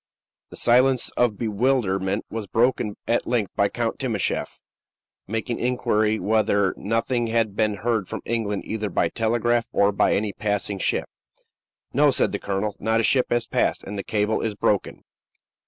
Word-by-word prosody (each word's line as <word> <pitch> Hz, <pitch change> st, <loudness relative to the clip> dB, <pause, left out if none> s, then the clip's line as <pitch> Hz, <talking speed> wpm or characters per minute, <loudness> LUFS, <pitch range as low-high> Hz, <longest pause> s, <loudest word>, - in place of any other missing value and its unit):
The -, -, -11 dB
silence 125 Hz, +1 st, +3 dB
of 120 Hz, -4 st, +1 dB
bewilderment 105 Hz, -4 st, 0 dB
was 110 Hz, -2 st, -4 dB
broken 115 Hz, -2 st, +1 dB
at 120 Hz, -, +1 dB
length 115 Hz, -5 st, 0 dB
by 100 Hz, 0 st, +2 dB
Count 115 Hz, +1 st, -2 dB
Timascheff 115 Hz, -8 st, -2 dB, 0.7 s
making 115 Hz, +3 st, -3 dB
inquiry 110 Hz, -3 st, +1 dB
whether 100 Hz, -2 st, +2 dB
nothing 115 Hz, +3 st, -1 dB
had 115 Hz, -3 st, 0 dB
been 110 Hz, -1 st, +1 dB
heard 110 Hz, -1 st, -1 dB
from -, -, -6 dB
England, 110 Hz, -3 st, -2 dB
either 110 Hz, -1 st, -3 dB
by 85 Hz, -1 st, +1 dB
telegraph 120 Hz, +2 st, 0 dB
or 100 Hz, 0 st, +3 dB
by 100 Hz, -, +2 dB
any 105 Hz, -1 st, -1 dB
passing 105 Hz, -1 st, -2 dB
ship. -, -, 0 dB, 0.9 s
"No," 145 Hz, +3 st, +5 dB
said -, -, +2 dB
the 100 Hz, -, -3 dB
colonel; 100 Hz, +1 st, -2 dB
"not 110 Hz, 0 st, +1 dB
a -, -, +1 dB
ship 130 Hz, +3 st, +3 dB
has 120 Hz, -1 st, +1 dB
passed; -, -, 0 dB
and 100 Hz, -, -7 dB
the 100 Hz, -, -2 dB
cable 105 Hz, 0 st, 0 dB
is 110 Hz, -2 st, -2 dB
broken." 100 Hz, -1 st, -1 dB
110 Hz, 160 wpm, -24 LUFS, 100-120 Hz, 0.9 s, No